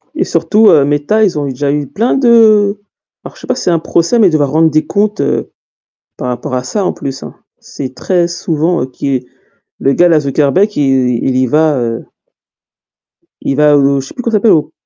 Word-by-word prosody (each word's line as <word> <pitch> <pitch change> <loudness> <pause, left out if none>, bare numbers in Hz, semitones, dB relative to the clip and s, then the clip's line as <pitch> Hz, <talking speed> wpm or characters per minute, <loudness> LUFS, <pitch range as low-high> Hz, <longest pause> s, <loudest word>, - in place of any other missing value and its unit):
Et - - 0
surtout, 215 0 +2
heu, 145 - +5
Méta, 145 +10 0
ils 185 -6 0
ont 145 - -3
eu - - -3
déjà 140 +2 -2
eu 145 -1 -2
plein 230 - -1
de 215 -5 +3 0.4
alors - - -11
je - - -16
sais - - -11
pas 255 - 0
si - - -6
c'est 175 - +1
un 165 - +1
procès 170 +8 0
mais 200 -5 +5
devoir 145 -4 0
rendre 160 +2 +3
des 155 0 0
comptes, 210 0 -1 1.0
par 125 - -5
rapport 125 +1 -4
à 125 - -2
ça, 200 +10 -3
en - - 0
plus 135 -1 -7
hein. - - -10 0.2
C'est 130 -2 -8
très 175 -2 0
souvent, 170 0 -2
heu, - - -4
qui 130 -1 -4 0.5
le 135 - +1
gars-là, 170 0 +3
Zuckerbeck, 150 +9 0
il 145 - +1 0.4
il 130 -1 0
y 130 0 +2
va 155 +3 +1
heu 115 -1 -3 1.4
il 135 - -2
va, 150 0 +4
heu, 140 0 +2
je 135 - -7
sais - - -12
plus 250 - -7
comment 235 - -1
ça 215 - +2
s'appelle? 210 +1 +3
Au 155 - +1
155 Hz, 220 wpm, -12 LUFS, 140-205 Hz, 1.4 s, heu